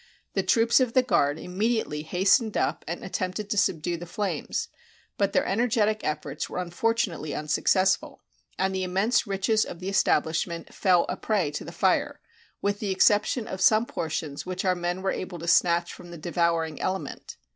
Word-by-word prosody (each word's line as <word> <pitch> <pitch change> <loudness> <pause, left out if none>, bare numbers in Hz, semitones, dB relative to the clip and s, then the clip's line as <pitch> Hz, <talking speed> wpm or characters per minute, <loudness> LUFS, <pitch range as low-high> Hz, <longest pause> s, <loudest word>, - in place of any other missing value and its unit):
The - - +1
troops 230 +1 +4
of 250 -3 +1
the 255 - +4
guard 145 - +2
immediately 190 -3 -1
hastened 195 +7 +2
up - - 0
and 170 +2 -5
attempted 190 +2 -3
to - - +1
subdue 175 -3 +1
the 175 +1 -8
flames, 205 +2 -3 0.5
but 200 -1 +1
their - - +2
energetic 215 0 +1
efforts 155 - -3
were - - -6
unfortunately 180 -3 -1
un 150 - -5
successful, 190 +5 +1 0.3
and 190 0 0
the 190 - -1
immense 195 +6 +1
riches 200 +3 +1
of 170 - -8
the 185 +2 -4
establish 160 -4 +2
ment 170 -1 -8
fell 180 -3 +3
a - - -2
prey 195 -9 0
to 145 - -5
the - - -8
fire, - - +1 0.4
with 205 0 0
the 210 - -3
exception 210 +4 +3
of 190 - -5
some 215 +4 +5
portions 155 -7 -4
which 185 +1 -4
our 185 - +4
men 175 +1 -3
were 195 - +1
able 185 -1 -5
to 170 +1 -7
snatch 170 +1 +3
from 175 - -12
the 170 - -9
devouring 165 -1 -1
element. 190 0 -4
185 Hz, 180 wpm, -26 LUFS, 170-210 Hz, 0.5 s, some